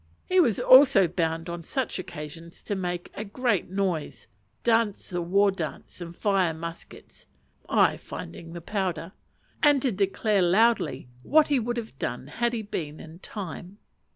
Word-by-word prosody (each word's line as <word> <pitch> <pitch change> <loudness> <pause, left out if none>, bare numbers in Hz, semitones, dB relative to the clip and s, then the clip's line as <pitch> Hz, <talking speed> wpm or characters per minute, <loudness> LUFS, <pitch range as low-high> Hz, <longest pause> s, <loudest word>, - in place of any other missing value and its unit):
He 370 - +3
was 245 - +3
also 255 -7 +7
bound 165 -1 -2
on 170 0 -5
such 255 - -2
occasions 165 0 -9
to - - -3
make 180 -2 -3
a 210 - -5
great 220 -2 -1
noise, 170 - -2 0.4
dance 225 -5 +1
the 175 -1 -1
war 195 +4 +3
dance, 175 0 -6
and 170 0 -7
fire 190 -5 +1
muskets 165 +1 -10 0.4
(I - - +4
finding 165 - -9
the 170 - -7
powder), 180 -3 -3 0.5
and 290 -2 +5
to 260 - +2
declare 200 +1 +1
loudly 185 - +2
what 305 - +4
he 285 -3 +3
would 240 +1 -2
have 220 - -6
done 125 +1 -3
had 235 - -1
he 230 - -2
only 205 - -13
been 155 -5 -4
in 160 +1 -11
time. 190 -1 -7
190 Hz, 160 wpm, -26 LUFS, 170-225 Hz, 0.5 s, also